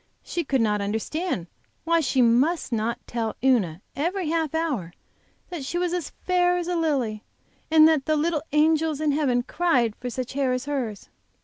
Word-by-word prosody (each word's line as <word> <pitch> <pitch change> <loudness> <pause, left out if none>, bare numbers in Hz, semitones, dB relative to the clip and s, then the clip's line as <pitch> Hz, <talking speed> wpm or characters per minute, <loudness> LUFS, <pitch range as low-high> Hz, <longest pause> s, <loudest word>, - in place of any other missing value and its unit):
She 345 - -3
could 270 -4 +1
not 210 -2 +1
understand 220 - -2 0.4
why 335 0 +2
she 265 -4 +2
must 260 +8 +2
not 230 0 -1
tell 225 -2 -3
Una 200 -10 +2
every 345 +3 -1
half 320 -2 -1
hour 265 - -2 0.6
that 340 -6 -5
she 310 +6 -3
was 355 0 0
as 355 -4 -2
fair 355 -1 +1
as 350 -1 -3
a 355 - -1
lily, 265 -10 -1 0.5
and 315 0 +7
that 310 -4 +2
the 310 - +3
little 310 0 0
angels 310 0 +2
in 305 -1 +1
heaven 270 -5 +1
cried 250 -8 +1
for 250 - -6
such 250 +1 -5
hair 270 -2 +1
as 255 +1 -3
hers. 255 -8 -3
285 Hz, 180 wpm, -25 LUFS, 240-330 Hz, 0.6 s, and